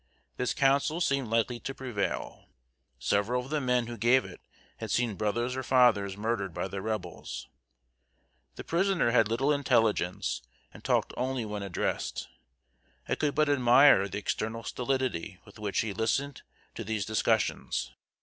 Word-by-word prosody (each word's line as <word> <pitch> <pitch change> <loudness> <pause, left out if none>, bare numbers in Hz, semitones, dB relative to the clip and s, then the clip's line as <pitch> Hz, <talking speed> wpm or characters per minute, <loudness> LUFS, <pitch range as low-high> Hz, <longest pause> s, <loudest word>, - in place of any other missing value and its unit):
This 125 - -1
counsel 140 +3 +2
seemed 140 -6 +1
likely 115 +2 0
to 135 - -6
prevail. 120 -7 -4 0.5
Several 105 - 0
of 135 - -11
the 155 -1 0
men 125 -2 +1
who 120 0 -7
gave 120 +3 +4
it - - -11 0.4
had - - -6
seen 120 -3 +1
brothers 120 +5 -1
or 130 - -2
fathers 120 -7 +3
murdered 105 -4 -2
by - - -2
the 95 +1 -5
Rebels. 95 -5 -5 1.1
The - - -7
prisoner 175 -6 +1
had 115 -3 +4
little 135 +7 +1
intelligence, 115 -10 +1 0.3
and - - -13
talked - - +1
only 130 -2 -1
when 105 -1 -4
addressed. 100 -3 -3 0.8
I - - 0
could 150 -2 0
but 155 0 +3
admire 130 -5 +6
the 95 - -4
external 110 +2 -3
stolidity 125 -8 -2
with 105 0 -15
which 105 -2 0
he 110 -2 -3
listened 125 +6 -1 0.3
to - - -6
these 110 -2 -2
discussions. 110 -1 0
120 Hz, 150 wpm, -29 LUFS, 105-130 Hz, 1.1 s, admire